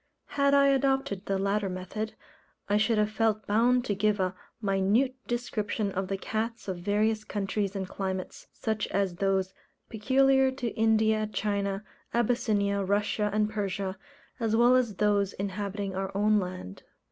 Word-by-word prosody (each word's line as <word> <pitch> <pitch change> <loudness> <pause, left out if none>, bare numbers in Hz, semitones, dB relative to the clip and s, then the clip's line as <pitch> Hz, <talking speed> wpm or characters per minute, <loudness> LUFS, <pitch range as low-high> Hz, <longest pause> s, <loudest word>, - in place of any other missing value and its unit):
Had 280 0 +3
I 280 0 +5
adopted 270 -7 +1
the 195 - +1
latter 200 +1 0
method, 185 +4 -5 0.5
I 205 - +2
should 220 +1 +2
have 210 0 +2
felt 220 -1 0
bound 240 +4 +3
to 205 - 0
give 210 +1 +1
a 185 -1 0 0.3
minute 205 +5 +2
description 215 -3 -2
of 190 0 -2
the 195 - -2
cats 225 +3 -3
of 185 -2 -3
various 215 +3 +1
countries 205 -1 -2
and 190 -1 -3
climates, 190 -1 -5
such 220 -2 -2
as 195 -3 -1
those 190 -1 0 0.4
peculiar 265 +4 +3
to 250 -3 -3
India, 220 -1 +2
China, 200 -1 -2 0.3
Abyssinia, 210 -4 +1
Russia, 205 +2 0
and 210 +1 +2
Persia, 195 -2 -2 0.4
as 225 -2 +1
well 240 +2 +5
as 240 -5 +1
those 205 -1 +2
inhabiting 200 0 -3
our 195 0 -2
own 210 +1 +4
land. 180 - -6
210 Hz, 150 wpm, -28 LUFS, 195-225 Hz, 0.5 s, I